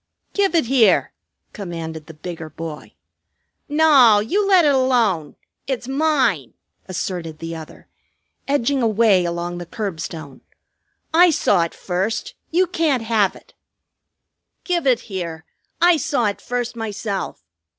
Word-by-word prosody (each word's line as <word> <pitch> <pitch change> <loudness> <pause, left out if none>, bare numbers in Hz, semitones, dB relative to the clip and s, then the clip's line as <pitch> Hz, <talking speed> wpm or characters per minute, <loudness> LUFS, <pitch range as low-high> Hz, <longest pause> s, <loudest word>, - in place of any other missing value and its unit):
"Give 395 -3 +1
it 325 - +3
here!" 240 -2 +3 0.4
commanded 165 -5 -6
the 160 - -11
bigger 160 0 -7
boy. 160 -1 -8 0.7
"Naw! 290 -8 +6
You 385 - 0
let 370 -4 +5
it 290 - +4
alone! 235 - +1 0.3
It's 255 -3 -3
mine!" 265 - +1 0.3
asserted 175 -3 -4
the 165 +1 -6
other, 160 -1 -11 0.6
edging 280 -1 +1
away 215 -5 +3
along 175 +1 -3
the 175 - -8
curbstone. 160 - -6 0.7
"I 350 +2 +7
saw 205 - +2
it 170 - -9
first. 190 +4 -2 0.2
You 360 +3 +3
can't 320 -9 0
have 220 -4 +1
it." - - -17 1.1
"Give 345 -5 -1
it 250 -3 +3
here. 170 -6 -6 0.3
I 350 -1 +5
saw 290 -6 0
it 205 -1 -2
first 245 -1 -3
myself. 210 - -4
220 Hz, 130 wpm, -21 LUFS, 175-275 Hz, 1.1 s, I